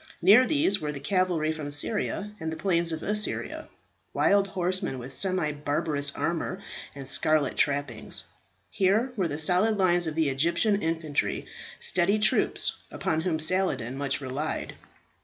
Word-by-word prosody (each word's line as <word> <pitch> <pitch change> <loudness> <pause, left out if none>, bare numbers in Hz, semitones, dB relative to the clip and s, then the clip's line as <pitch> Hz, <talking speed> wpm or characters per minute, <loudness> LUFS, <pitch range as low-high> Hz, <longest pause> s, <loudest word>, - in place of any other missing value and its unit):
Near 215 +8 +6
these 285 -10 +2
were 150 -1 -2
the 145 - -7
cavalry 170 0 0
from 155 -2 -5
Syria 205 +6 -2
and 160 0 -4
the 160 - -5
plains 170 0 +1
of 160 - -4
Assyria 210 +1 -1 0.5
wild 200 0 +3
horsemen 185 -6 -1
with 125 +2 -8
semi 185 -5 +2
barbarous 145 0 -1
armour 175 +3 -2 0.4
and 135 -1 -7
scarlet 150 0 +2
trappings. 140 -6 -1 0.5
Here 210 +7 +1
were 190 -6 0
the 145 -2 -4
solid 185 +7 +3
lines 175 -3 +2
of 155 - -4
the 160 -3 +2
Egyptian 170 +9 +1
infantry, 160 -3 -1 0.3
steady 185 +4 +3
troops, 215 0 +2
upon 160 0 -2
whom 165 -2 -1
Saladin 155 -7 0
much 140 0 -1
relied. 140 +4 -4
165 Hz, 145 wpm, -27 LUFS, 145-190 Hz, 0.5 s, Near